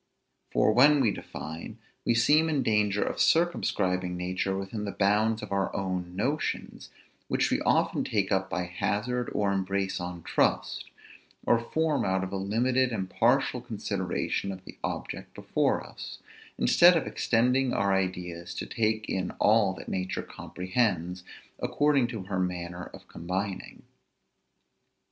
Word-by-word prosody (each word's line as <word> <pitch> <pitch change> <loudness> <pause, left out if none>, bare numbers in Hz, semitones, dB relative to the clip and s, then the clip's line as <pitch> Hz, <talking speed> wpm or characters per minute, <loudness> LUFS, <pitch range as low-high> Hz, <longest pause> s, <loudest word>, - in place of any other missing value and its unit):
For, - - +3
when 145 +5 +6
we 120 -6 +3
define, 80 +1 -7 0.3
we 120 - +3
seem 150 +7 +4
in 145 -4 +1
danger 105 -2 +2
of - - -2
circumscribing 90 - +1
nature 90 +2 -1
within 100 +2 -4
the 100 - -3
bounds 105 +3 +2
of 105 - -7
our 100 -1 0
own 90 -2 -3
notions, 135 +10 -2 0.4
which - - +1
we - - +1
often - - +2
take 100 -3 -1
up 95 -1 +1
by 90 - -1
hazard 105 +7 -2
or 100 -1 +1
embrace 95 0 -1
on 90 -1 -6
trust, - - 0 0.6
or 120 - +4
form 155 +5 0
out 95 0 +1
of 95 - -5
a - - -1
limited 125 +6 +1
and 95 -5 -3
partial - - +2
consideration 100 - -2
of 95 -1 -9
the - - -12
object - - -5
before - - 0
us; - - -9 0.4
instead 175 0 +6
of 160 - -1
extending 125 +2 +2
our 100 -3 +1
ideas 90 -2 -2
to - - -4
take 110 -2 -1
in 95 -1 -1
all 105 -2 +4
that - - -10
nature 95 0 -2
comprehends, 90 -2 -2 0.4
according 145 -4 +2
to 115 -5 -5
her 95 -1 -3
manner 90 -1 -3
of - - -13
combining. 95 +3 -4
100 Hz, 145 wpm, -28 LUFS, 95-120 Hz, 0.6 s, when